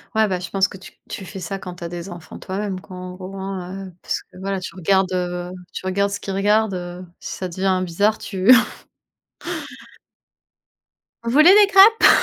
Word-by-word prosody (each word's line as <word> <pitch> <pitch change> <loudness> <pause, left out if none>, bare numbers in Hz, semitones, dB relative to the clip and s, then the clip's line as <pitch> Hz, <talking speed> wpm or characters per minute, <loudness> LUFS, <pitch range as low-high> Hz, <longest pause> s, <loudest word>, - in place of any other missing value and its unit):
Ouais, 220 -1 +4
bah, 185 -2 -1
je 180 - -6
pense 195 0 +2
que 190 - -11
tu 190 - -13 0.2
tu 190 - -6
fais 190 +1 -8
ça 190 +3 -4
quand 180 -2 -8
tu 175 - -10
as 170 - -4
des 175 +2 -6
enfants 175 -2 -10
toi 190 +1 -5
même 195 -3 -3
quoi 185 - -11
en 180 0 -7
gros, 190 +1 -8
hein, 190 0 -5
heu, 180 - -13
parce - - -2
que - - -19
voilà, 195 0 -2
tu 185 - -8
regardes, 190 +1 +2
heu 180 0 -2 0.2
tu - - -6
regardes 200 +2 +1
ce 205 - -3
qu'ils 195 - -5
regardent, 210 +1 +2
heu, 180 0 -6
si - - -6
ça 185 - -3
devient 185 +1 0
bizarre 205 +6 +1
tu 195 +4 +2 2.7
Vous 230 - -2
voulez 310 +7 +8
des 415 -1 +7
crêpes? 400 +3 +7
190 Hz, 205 wpm, -21 LUFS, 180-200 Hz, 2.7 s, voulez